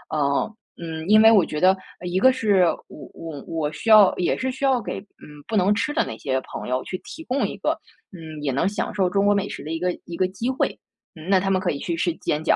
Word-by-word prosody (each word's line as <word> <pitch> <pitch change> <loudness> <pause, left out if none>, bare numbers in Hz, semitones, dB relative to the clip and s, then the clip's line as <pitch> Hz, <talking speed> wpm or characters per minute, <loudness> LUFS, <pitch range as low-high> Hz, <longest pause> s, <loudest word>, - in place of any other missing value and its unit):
嗯 140 +8 0 0.3
嗯， 160 0 -6
因 215 0 +7
为 225 - +8
我 200 -6 +6
觉 150 - -4
得， 185 +1 +5 0.3
一 180 +1 -1
个 260 +4 +6
是 205 -8 +3 0.2
我 - - -12
我 155 -4 -8
我 155 -2 -2
需 225 - -4
要 210 -3 +7
也 180 - 0
是 260 0 -2
需 265 +2 -8
要 260 -2 +3
给， 195 -1 -5
嗯， 150 -7 -16
不 225 - -3
能 195 +2 +4
吃 295 - -1
的 325 - +1
那 - - -6
些 130 -2 -1
朋 - - -8
友 130 0 -1
去 185 - -4
提 325 - -9
供 260 +2 0
一 - - -7
个， - - -1 0.4
嗯， 160 -3 -9
也 140 - 0
能 150 +8 +1
享 215 +3 -3
受 185 -3 +2
中 200 +2 +1
国 205 - +5
美 200 0 -1
食 - - -7
的 155 - -6
一 165 - -2
个 180 0 0
一 170 - -7
个 185 - +2
机 230 +6 -3
会。 260 - -1 0.4
嗯， 160 +2 -11
那 190 -2 +5
他 195 +1 -1
们 190 -1 +2
可 185 - 0
以 140 - -4
去 170 - -3
吃 175 0 0
煎 150 +1 -2
饺。 - - +4
185 Hz, 285 characters per minute, -23 LUFS, 160-210 Hz, 0.4 s, 为